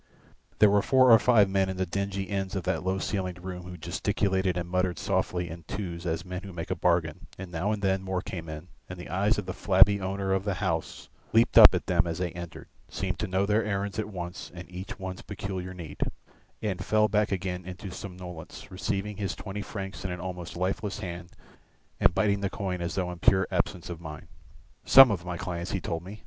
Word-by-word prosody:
There 105 -2 +6
were 100 0 +4
four 130 +1 +5
or 115 - +9
five 110 -3 +5
men 95 0 +1
in 95 - -4
the 95 - 0
dingy 100 +1 -2
ends 95 -1 -2
of 95 - -2
that 95 +1 -1
low 95 +1 0
ceilinged 90 -2 -3
room 90 -1 -6
who 90 - -8
gesticulated 95 +2 0
and 85 -1 -2
muttered 90 0 0
softly 95 -2 -1
in 85 +1 -8
twos 85 -4 -4
as 80 +2 -2
men 90 0 -5
who 100 -1 -9
make 85 +1 -5
a - - +1
bargain, 85 -2 0
and 95 -1 -8
now 90 +5 -1
and 105 -1 -3
then 95 -1 +2
more 95 -1 -2
came 85 -3 -6
in, 75 +3 -8 0.2
and 90 - -7
the 90 - -8
eyes 100 +5 +2
of 105 - -3
the - - -4
flabby 100 0 +5
owner 95 0 -1
of 95 0 +1
the 100 -2 -1
house 85 -5 -2 0.3
leaped 115 +1 +4
up - - +10
at - - -2
them 85 - +2
as 80 -1 -3
they 90 -2 -2
entered, 85 -1 -8 0.2
seemed - - -3
to - - -1
know 95 +1 +1
their 105 +2 +2
errands 100 0 -2
at 110 - -2
once 90 -2 -6
and 85 0 -8
each 95 +2 -7
one's 95 -1 -6
peculiar 95 -2 -5
need, 85 -5 -9 0.6
and 100 -4 -2
fell 110 0 +3
back 105 0 +1
again 95 -1 -2
into 95 +1 -7
somnolence, 90 -4 -9
receiving 100 +2 -2
his 100 -2 -2
twenty 105 0 -6
francs 95 -2 -6
in 95 - -2
an 90 0 -4
almost 90 -1 -6
lifeless 95 +3 -1
hand 85 -4 -6 0.7
and 85 - +4
biting 100 -1 +2
the 100 -1 -1
coin 95 -3 -3
as 85 +2 -3
though 90 -2 -1
in 90 - -8
pure 95 +3 +4
absence 90 - -1
of 85 -1 -7
mind. 75 -2 -8 0.6
"Some 135 -3 +9
of 90 -4 -2
my 90 -1 -3
clients," 85 0 -4
he 95 - 0
told 85 -1 -3
me. 100 +4 -9
95 Hz, 220 wpm, -28 LUFS, 90-100 Hz, 0.7 s, up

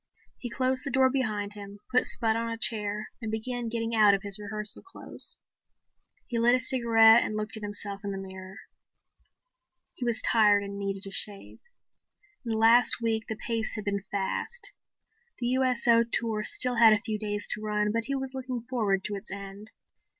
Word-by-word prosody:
He 245 - -5
closed 260 +2 0
the 280 - -3
door 260 0 +3
behind 215 -6 -2
him, 205 0 -10
put 250 - +4
Spud 225 -2 +3
on 230 0 -2
a 230 - -4
chair 210 -2 -1
and 225 - -4
began 235 +2 -3
getting 230 0 -2
out 210 -3 +6
of 195 - -6
his 200 0 -2
rehearsal 210 0 -4
clothes. 380 - -2 0.9
He 240 -3 -3
lit 240 +2 +5
a - - +1
cigarette 230 -2 +5
and 215 - -3
looked 215 +1 -4
at 220 - -8
himself 205 -1 -4
in 200 - -4
the 195 - -4
mirror. 190 0 -9 1.3
He - - -7
was 235 -2 +1
tired 210 -2 +4
and 200 0 -7
needed 195 0 -3
a 195 - -7
shave. 200 0 -4 0.8
In 230 -2 -3
the - - -1
last 230 +3 +5
week 225 -1 -1
the 220 - -2
pace 225 0 -3
had 210 - -6
been 200 -1 -1
fast. 205 - -3 0.7
The 240 -1 -2
USO 250 -2 +3
tour 230 -2 -2
still 250 +2 0
had 225 -1 +7
a 210 - +2
few 215 -2 -3
days 205 -1 -3
to 215 - -3
run, 210 -1 0
but 230 +1 -1
he 275 +3 -2
was 265 -1 -4
looking 255 -3 -5
forward 210 -7 0
to 210 - -4
its 200 +2 -9
end. 200 +2 -8
220 Hz, 190 wpm, -28 LUFS, 205-240 Hz, 1.3 s, had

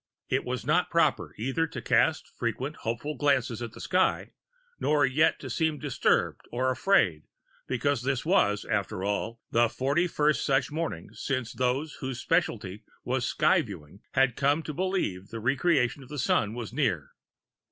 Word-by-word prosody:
It - - +1
was - - -3
not - - +2
proper - - +1
either 135 +8 0
to - - -6
cast - - +2
frequent - - -3
hopeful 120 +7 -3
glances 135 -6 +1
at 115 -2 -5
the - - -11
sky, 185 0 +1 0.5
nor 150 -3 +3
yet 150 +5 +2
to - - -6
seem 160 -2 0
disturbed - - +1
or 130 +2 +1
afraid 125 - +2 0.4
because 135 0 0
this 135 +1 -1
was, 105 - +2
after 100 -2 -2
all, 105 +3 -2
the 115 0 +4
forty 140 +9 +1
first 150 -2 +1
such 135 +1 +1
morning 165 +2 -4
since 130 -4 -3
those 130 +5 -1
whose 130 -3 -4
specialty 115 - -1 0.2
was - - -1
Sky - - +3
Viewing 75 +6 -10
had 130 -2 +3
come 145 +3 +2
to 155 - -5
believe 180 - -1
the 115 - -6
Re 130 +5 +1
creation 140 -5 +1
of 130 - -13
the 150 - -6
Sun 110 -4 +1
was 120 -2 -6
near. 90 - 0
130 Hz, 165 wpm, -28 LUFS, 115-150 Hz, 0.5 s, the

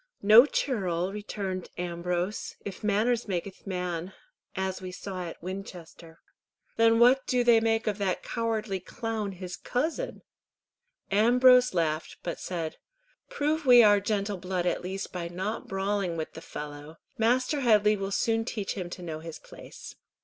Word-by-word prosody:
"No 220 +6 +9
churl," 190 - -1
returned 200 -3 -4
Ambrose, 175 +3 -3
"if 200 0 -7
manners 220 +3 +1
makyth 190 +1 -5
man, 180 -1 -3 0.4
as 190 0 -2
we 185 -1 -6
saw 185 -1 -6
at 165 - -9
Winchester." 175 -3 -9 0.5
"Then 230 0 +4
what 250 +3 +5
do 250 -1 +2
they 235 -1 +6
make 225 0 +1
of 210 -1 -1
that 190 -3 -1
cowardly 220 -4 -2
clown, 215 +2 -4
his 180 0 -7
cousin?" 315 - -3 0.9
Ambrose 250 +2 +5
laughed, 160 -2 -1
but 170 - -4
said, 165 -3 -4 0.5
"Prove 305 +2 -1
we 245 -1 +9
our 205 -1 +6
gentle 200 -1 -1
blood 180 -1 -3
at 175 - 0
least 190 +2 -5
by 175 -2 -3
not 190 +6 -4
brawling 195 -2 -1
with 160 - -4
the 160 - -9
fellow. 150 +1 -8 0.2
Master 255 +6 +2
Headley 215 -4 +4
will 195 -1 -3
soon 225 +2 +1
teach 215 -4 -3
him 180 -4 -5
to 180 - -8
know 160 -2 -5
his 165 0 -8
place." - - -12
195 Hz, 150 wpm, -28 LUFS, 180-225 Hz, 0.9 s, No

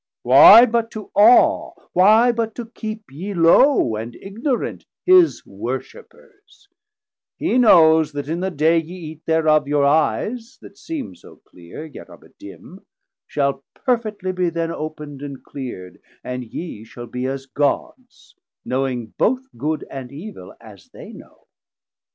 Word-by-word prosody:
Why 150 - +9
but 230 -1 -1
to 215 -3 -9
awe, 225 +4 +4 0.2
Why 215 +7 +5
but 225 -2 -3
to 240 - -6
keep 220 - -8
ye 190 +8 -6
low 170 - +4
and 115 +2 -7
ignorant, 230 - -4 0.2
His 365 -2 +4
worshippers; 455 -4 -9 0.7
he 255 - 0
knows 160 -8 +5
that 145 -1 -5
in 165 +3 -3
the 190 +1 -2
day 165 0 +2
Ye 165 -1 -8
Eate 160 0 -16
thereof, 155 -2 +2
your 145 -1 +1
Eyes 225 - -1
that - - -14
seem 320 - -6
so - - -17
cleere, 90 - -11
Yet 155 - -12
are - - -14
but - - -23
dim, - - -13 0.4
shall 140 -1 -2
perfetly 215 -7 -2
be 180 -1 0
then 165 0 -3
Op'nd 150 -3 -7
and 140 -2 -8
cleerd, 105 -10 -9 0.2
and 125 0 -5
ye 115 -2 -8
shall 120 +2 -11
be 125 +2 -5
as 135 0 -5
Gods, 245 - -4 0.3
Knowing 125 -4 -3
both 255 +3 +1
Good 155 +2 -3
and 130 -2 -9
Evil 155 - -10
as - - -16
they - - -12
know. - - -16
165 Hz, 145 wpm, -20 LUFS, 140-225 Hz, 0.7 s, Why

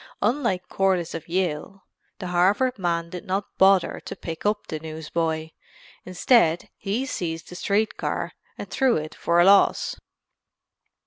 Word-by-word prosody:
Unlike 225 -6 0
Corliss 185 -3 0
of 165 - -6
Yale, 180 +1 -2 0.3
the 185 -3 -6
Harvard 200 +8 +2
man 170 -2 -1
did 180 - -6
not 195 +2 -3
bother 190 -1 +4
to - - -6
pick 165 +4 -5
up 210 0 0
the 155 - -5
newsboy. 160 0 -3 0.5
Instead 180 -2 +2
he 215 +7 -2
seized 165 -10 -4
the 180 - -9
street 210 +4 0
car - - -2 0.3
and - - -6
threw 265 -3 +2
it 155 0 -5
for 170 0 +1
a 175 - +6
loss. 195 0 +4
180 Hz, 145 wpm, -24 LUFS, 165-200 Hz, 0.5 s, a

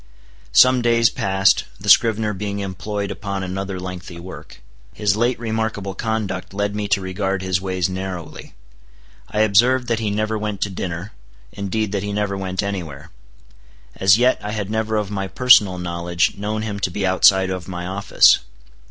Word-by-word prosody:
Some 130 -1 +6
days 115 -1 +3
passed, 95 0 +2
the - - -9
scrivener 110 -1 +4
being 100 +1 -4
employed 100 +1 -4
upon 100 -2 -4
another 95 +1 -4
lengthy 90 -1 -7
work. 95 +2 -11 0.4
His 105 -2 +1
late 120 +3 +1
remarkable 110 -4 -3
conduct 100 -3 -3
led 100 0 -1
me 105 -1 -2
to 100 0 +1
regard 95 0 -2
his 95 -1 0
ways 95 -2 -1
narrowly. 95 -2 -7 0.7
I 105 - 0
observed 120 +5 +3
that 115 -1 +1
he 110 -2 -1
never 110 +1 -1
went 105 -2 -4
to 100 - -1
dinner; 90 +2 -5 0.4
indeed 100 +1 -3
that 100 -2 -1
he 100 +1 -4
never 100 -1 -1
went 95 0 -3
any 100 -2 -2
where. 70 -5 -11 0.8
As 95 +2 +5
yet 125 +2 +3
I 105 +1 -4
had 105 -2 -4
never 110 0 -1
of 105 -1 -2
my 95 -1 -3
personal 105 -5 +5
knowledge 85 0 -1
known 105 +2 -3
him 105 -2 -4
to 95 - 0
be 95 +2 -2
outside 95 0 +4
of 90 -2 -5
my 90 -1 -5
office. 95 +2 +4
100 Hz, 170 wpm, -20 LUFS, 95-110 Hz, 0.8 s, Some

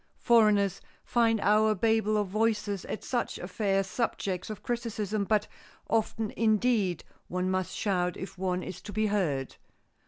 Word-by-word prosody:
Foreigners 210 -5 +3 0.2
find 230 -2 +2
our 215 +1 +4
babel 220 +1 +2
of 210 - +1
voices 210 -1 0
at - - -5
such 245 -2 -2
affairs 195 +1 0
subjects 190 -3 -2
of 215 - -7
criticism 215 -4 -2
but 215 +1 +1 0.4
often 225 -1 0
indeed 215 -5 +1 0.2
one 180 +1 -1
must 185 -2 -2
shout 180 -4 0
if 190 0 -7
one 180 -1 -1
is 180 - -7
to - - -8
be 215 +2 0
heard. 165 -11 -1
210 Hz, 145 wpm, -29 LUFS, 185-220 Hz, 0.4 s, our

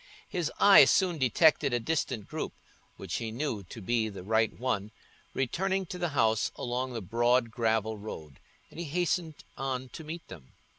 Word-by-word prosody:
His 170 -3 -2
eye 200 -1 +9
soon 180 -4 +2
detected 140 +1 +4
a - - +1
distant 125 -5 -2
group, - - -4 0.4
which 95 -3 -4
he 115 -2 -3
knew 120 -3 -2
to 110 - -10
be 115 +1 +1
the 100 -3 -9
right 110 +2 +2
one, 110 -5 -1 0.5
returning 190 +9 0
to 180 +1 -7
the 175 -1 0
house 110 -2 +2
along 125 +1 -3
the 115 - -4
broad 120 +3 +2
gravel 110 -1 0
road, 80 -9 -8 0.3
and - - -10
he 170 - -3
hastened 170 0 -1
on 130 -1 -3
to 160 - -9
meet 165 +2 -7
them. 75 -9 -12
125 Hz, 170 wpm, -29 LUFS, 110-160 Hz, 0.5 s, eye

